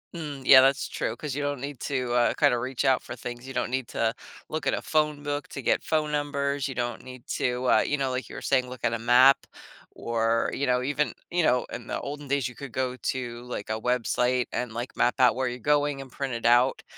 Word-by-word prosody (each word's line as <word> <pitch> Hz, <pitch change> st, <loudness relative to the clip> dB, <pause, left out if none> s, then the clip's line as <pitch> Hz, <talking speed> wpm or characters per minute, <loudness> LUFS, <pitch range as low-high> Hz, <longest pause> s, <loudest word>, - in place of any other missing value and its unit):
Mm, 145 Hz, -4 st, -6 dB
yeah, 130 Hz, 0 st, +10 dB
that's 135 Hz, +2 st, +3 dB
true, 115 Hz, -, -3 dB
'cause 140 Hz, 0 st, -5 dB
you 145 Hz, -, -2 dB
don't 145 Hz, -2 st, -2 dB
need 140 Hz, -1 st, -6 dB
to, 130 Hz, -4 st, -2 dB
uh, 120 Hz, -1 st, +3 dB
kinda 120 Hz, -, +3 dB
reach 130 Hz, +1 st, -3 dB
out 130 Hz, -1 st, +3 dB
for -, -, -8 dB
things, 120 Hz, +1 st, -7 dB
you 135 Hz, -, -7 dB
don't -, -, -1 dB
need 130 Hz, -2 st, -1 dB
to 115 Hz, 0 st, 0 dB, 0.4 s
look 155 Hz, -1 st, -3 dB
at -, -, +2 dB
a -, -, -1 dB
phone 150 Hz, -2 st, 0 dB
book 145 Hz, 0 st, -3 dB
to 140 Hz, -, -6 dB
get -, -, +1 dB
phone 155 Hz, -1 st, 0 dB
numbers, 140 Hz, -1 st, -1 dB
you 135 Hz, -, -6 dB
don't 120 Hz, 0 st, -3 dB
need 130 Hz, -1 st, -11 dB
to, 125 Hz, +1 st, -1 dB
uh, -, -, +6 dB
you 145 Hz, -, 0 dB
know, 135 Hz, -2 st, 0 dB
like 130 Hz, 0 st, -3 dB
you -, -, -10 dB
were -, -, -6 dB
saying, 130 Hz, -2 st, +1 dB
look 125 Hz, -, -9 dB
at 115 Hz, -, +2 dB
a 115 Hz, -, -2 dB
map 125 Hz, +3 st, +5 dB, 0.4 s
or, 115 Hz, 0 st, 0 dB
you 140 Hz, -, -1 dB
know, 125 Hz, 0 st, +2 dB
even, 145 Hz, +2 st, 0 dB, 0.2 s
you 175 Hz, -1 st, +1 dB
know, 125 Hz, -4 st, +2 dB
in 115 Hz, 0 st, -7 dB
the -, -, -2 dB
olden 145 Hz, 0 st, -6 dB
days, 140 Hz, -2 st, 0 dB
you 125 Hz, -, -13 dB
could 140 Hz, -5 st, -9 dB
go 130 Hz, -1 st, -2 dB
to, 120 Hz, -2 st, -4 dB
like, 125 Hz, -4 st, -6 dB
a 110 Hz, 0 st, -1 dB
website 125 Hz, +1 st, +1 dB
and, 125 Hz, -2 st, -3 dB
like, 120 Hz, +2 st, -6 dB
map 120 Hz, -, +2 dB
out 125 Hz, -1 st, +5 dB
where 130 Hz, 0 st, -1 dB
you're 125 Hz, 0 st, -4 dB
going 145 Hz, 0 st, +1 dB
and 135 Hz, -, -11 dB
print 135 Hz, -3 st, -4 dB
it 115 Hz, -, -5 dB
out, 120 Hz, +2 st, +4 dB
130 Hz, 250 wpm, -26 LUFS, 125-140 Hz, 0.4 s, yeah